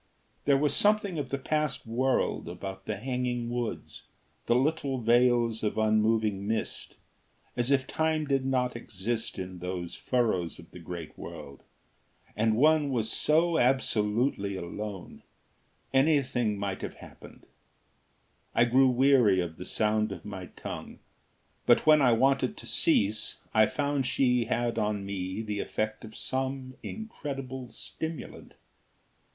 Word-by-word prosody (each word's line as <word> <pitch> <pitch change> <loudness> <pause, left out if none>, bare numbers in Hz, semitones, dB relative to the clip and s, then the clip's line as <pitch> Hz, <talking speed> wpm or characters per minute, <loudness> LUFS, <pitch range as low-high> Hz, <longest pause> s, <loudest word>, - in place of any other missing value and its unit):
There 140 -1 +5
was 145 0 +2
something 205 -5 +2
of 135 -3 -4
the 140 - -1
past 150 0 -1
world 125 -5 0
about 95 +2 -7
the 110 - -2
hanging 125 0 -2
woods, 120 -2 -4 0.5
the 120 - +4
little 140 0 +1
veils 120 -1 +3
of 105 - -1
unmoving 110 -2 +2
mist 110 0 -2 0.6
as 120 +1 0
if 135 -2 +3
time 160 -1 0
did 135 -2 +1
not 125 -2 0
exist 115 0 -4
in 90 -1 -6
those 90 -1 -4
furrows 110 -9 0
of 85 - -14
the 90 - -10
great 85 -1 -7
world; 70 -1 -9 0.7
and 110 +1 +2
one 150 +2 +4
was 115 -4 -1
so 160 +2 +2
absolutely 115 -4 +1
alone; 95 +1 -6 0.7
anything 135 -6 +2
might 100 -1 -3
have - - -5
happened. - - -14 1.1
I 120 - +5
grew 130 +3 +5
weary 125 -6 +4
of 85 -2 -3
the 90 - -7
sound 110 0 +1
of - - -8
my 95 -3 -6
tongue. - - -8 0.7
But - - +5
when 155 -1 +7
I 125 -3 +5
wanted 135 +4 +2
to - - -9
cease, 105 +2 +1 0.2
I 110 -1 +5
found 145 -2 -1
she 125 -3 +2
had 120 0 0
on 105 -2 -1
me 95 +1 -4
the 105 -2 -3
effect 110 +1 -3
of 110 -1 -10
some 130 0 -3
incredible 135 - -6
stimulant. 160 +3 -7
120 Hz, 135 wpm, -29 LUFS, 105-135 Hz, 1.1 s, when